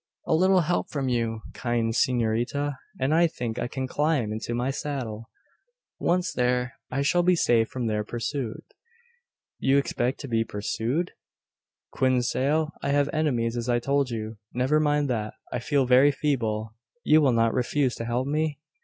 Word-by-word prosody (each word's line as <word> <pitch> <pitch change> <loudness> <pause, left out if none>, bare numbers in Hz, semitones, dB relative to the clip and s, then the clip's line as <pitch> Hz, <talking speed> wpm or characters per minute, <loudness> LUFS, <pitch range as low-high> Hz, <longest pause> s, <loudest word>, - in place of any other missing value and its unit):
"A - - +1
little 185 +3 +4
help 170 +2 -1
from 135 -3 -2
you, 115 -2 -1
kind 120 -2 -1
s'norita, 120 +4 +1 0.3
and 135 +3 +1
I 170 +1 +5
think 120 -7 -4
I - - -1
can 130 +1 -4
climb 145 -6 0
into 115 +2 -3
my 125 +3 0
saddle. 125 -7 -5 0.7
Once 175 -1 +1
there, 125 0 0 0.2
I 140 +2 -1
shall 175 +5 +3
be 180 +1 +4
safe 115 -8 +3
from 125 -2 -3
their 105 -1 0
pursuit." 120 +2 -4 1.0
"You 135 +1 +3
expect 130 -2 0
to 140 - -6
be 115 -2 +1
pursued?" 115 +10 -2 0.8
"Quien 130 -1 +2
sale? 150 +6 +1
I - - -2
have 145 0 +2
enemies, 125 -7 0
as 120 +1 -3
I 120 - +3
told 140 +2 +1
you. 110 -2 -5
Never 130 +5 +2
mind 150 -1 +2
that. 110 -3 -3 0.2
I - - -1
feel 140 +2 +1
very 130 +3 +6
feeble. 110 -7 -1 0.3
You 155 +1 +5
will 140 -3 +4
not 115 -1 +2
refuse 130 +1 +1
to 115 - -4
help 120 +2 -1
me?" 150 0 -1
130 Hz, 170 wpm, -26 LUFS, 115-145 Hz, 1.0 s, very